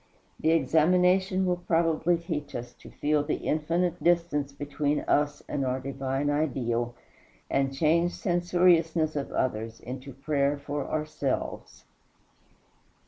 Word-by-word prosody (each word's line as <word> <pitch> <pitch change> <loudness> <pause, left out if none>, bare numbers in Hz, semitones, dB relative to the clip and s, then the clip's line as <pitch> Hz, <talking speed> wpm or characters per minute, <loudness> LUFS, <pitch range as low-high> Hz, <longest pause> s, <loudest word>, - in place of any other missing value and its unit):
The 160 - +1
examination 180 +5 +3
will 180 -1 +1
probably 165 0 +1
teach 165 -3 -5
us 120 0 -6
to - - -14
feel 150 0 +1
the 150 - -1
infinite 170 +3 0
distance 170 -5 +2
between 145 +1 -1
us 145 0 0
and 140 - -2
our 130 0 -1
divine 135 +1 -2
Ideal, 120 -5 -1 0.6
and 135 0 +1
change 165 +5 +2
censoriousness 175 -3 +2
of 140 -2 -3
others 115 -2 -2
into 130 +2 -8
prayer 140 +1 0
for 145 0 -4
ourselves. 150 -3 -3
150 Hz, 120 wpm, -28 LUFS, 135-170 Hz, 0.6 s, examination